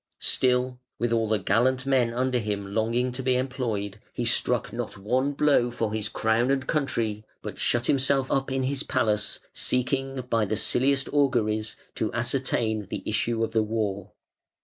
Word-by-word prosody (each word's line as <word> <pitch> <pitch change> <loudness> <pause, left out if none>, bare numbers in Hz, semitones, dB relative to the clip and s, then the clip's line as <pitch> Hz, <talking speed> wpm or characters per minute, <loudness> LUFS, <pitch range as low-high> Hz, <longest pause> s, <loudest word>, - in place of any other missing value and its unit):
Still, 125 0 +1 0.2
with 120 0 0
all 115 -1 +2
the 110 - +3
gallant 120 +7 +2
men 130 -4 +3
under 125 +1 0
him 100 -2 -3
longing 115 +3 +1
to 125 +2 -5
be 130 -1 +2
employed, 115 -6 -2
he 120 - -3
struck 120 -2 +1
not 120 -3 -4
one 130 +8 0
blow 140 -4 +3
for 115 -3 -2
his 110 -1 -2
crown 110 +4 +1
and 135 -1 +1
country, 115 -8 -1 0.2
but - - -6
shut 120 0 +1
himself 135 0 +2
up 135 0 0
in 135 0 0
his 135 +1 -1
palace, 110 -7 0
seeking 135 +1 -1
by 115 -3 +2
the 110 +1 -1
silliest 135 +5 +2
auguries 115 -7 +1 0.2
to 110 - -1
ascertain 120 -4 0
the - - -4
issue 115 +2 0
of 115 - -1
the 110 0 +2
war. 105 -3 -2
120 Hz, 170 wpm, -26 LUFS, 110-130 Hz, 0.2 s, the